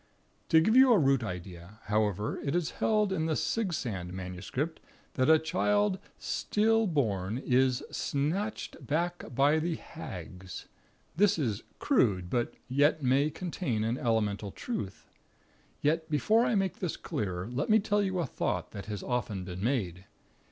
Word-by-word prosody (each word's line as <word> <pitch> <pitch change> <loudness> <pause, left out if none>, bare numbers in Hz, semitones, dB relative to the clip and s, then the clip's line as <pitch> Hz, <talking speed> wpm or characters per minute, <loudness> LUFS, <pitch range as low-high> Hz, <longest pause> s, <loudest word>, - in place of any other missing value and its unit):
"To 160 - +7
give 220 +8 +3
you 260 0 +8
a 230 - +7
root 135 -6 +3
idea, 90 0 -7
however, 105 -1 0
it 140 +2 -1
is 175 -3 0
held 210 -3 +2
in 160 -3 0
the 160 - +1
Sigsand 125 - -2
MS. 90 0 -6 0.6
that 130 +2 +2
a 160 - +8
child 200 +5 +1 0.2
'_still_born' 145 - +1
is 130 0 +2
'Snatyched 175 +10 -2
back 175 +3 -1
bye 145 +4 +4
thee 165 +1 -1
Haggs.' 90 - -8 0.5
This 205 +2 +4
is 115 -8 -1 0.2
crude; 100 - +2
but 120 -2 0
may - - -28
yet 140 +1 +2
contain 155 - -2
an 115 +3 -1
elemental 105 -3 0
truth. 100 - -5 0.8
Yet, 160 +2 +1
before 215 - +3
I 240 - +1
make 195 -2 0
this 180 -4 -2
clearer, 90 -3 -3
let 125 - -2
me 215 - +7
tell 205 0 +1
you 190 -2 -1
a 175 - +1
thought - - -2
that 100 -1 -8
has 105 -2 -4
often 115 -6 -2
been 90 +1 -6
made. 100 -8 -1
140 Hz, 150 wpm, -30 LUFS, -, 0.8 s, you